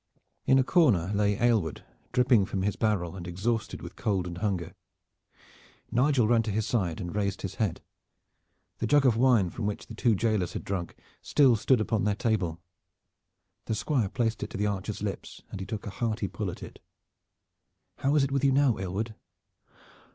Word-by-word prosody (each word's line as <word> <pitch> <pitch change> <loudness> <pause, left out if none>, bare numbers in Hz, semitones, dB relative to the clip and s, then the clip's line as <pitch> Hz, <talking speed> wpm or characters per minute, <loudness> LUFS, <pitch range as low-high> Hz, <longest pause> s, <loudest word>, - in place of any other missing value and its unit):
In 130 - +6
a 135 - +4
corner 120 - +3
lay 100 0 +2
Aylward, 110 -10 +1 0.3
dripping 120 -5 +4
from 95 -2 -2
his 100 +1 0
barrel 95 -6 0
and 90 -2 -7
exhausted 105 +5 -2
with - - -9
cold 95 -4 -1
and 85 -1 -6
hunger. 95 -5 -2 1.2
Nigel 130 -2 +3
ran 115 0 +4
to 110 - -4
his 110 +1 0
side 90 -9 -1
and 90 +2 -5
raised 100 -1 -1
his 95 - -3
head. 105 -6 -1 1.0
The 115 - -1
jug 145 +3 +4
of 125 -4 +5
wine 115 -7 +3
from 110 -3 -3
which 105 - -4
the - - -10
two 115 -1 +2
jailers 105 -4 0
had - - -5
drunk 95 -3 -4 0.3
still 135 -5 +4
stood 120 +3 +3
upon 110 -1 0
their 105 0 +1
table. 95 -8 -1 1.1
The 110 - -1
Squire 120 -3 0
placed 115 -1 -1
it - - -3
to - - -6
the 105 - 0
archer's 105 0 -3
lips 100 -2 -5
and - - -6
he 95 - -6
took 105 0 -5
a 100 - -5
hearty 110 -1 -2
pull - - -4
at - - -8
it. - - -10 1.2
"How 140 +2 +1
is 145 - +4
it 135 - -1
with 140 0 0
you 140 - +5
now, 135 -5 +3
Aylward?" 100 +4 -3
105 Hz, 190 wpm, -28 LUFS, 95-120 Hz, 1.2 s, In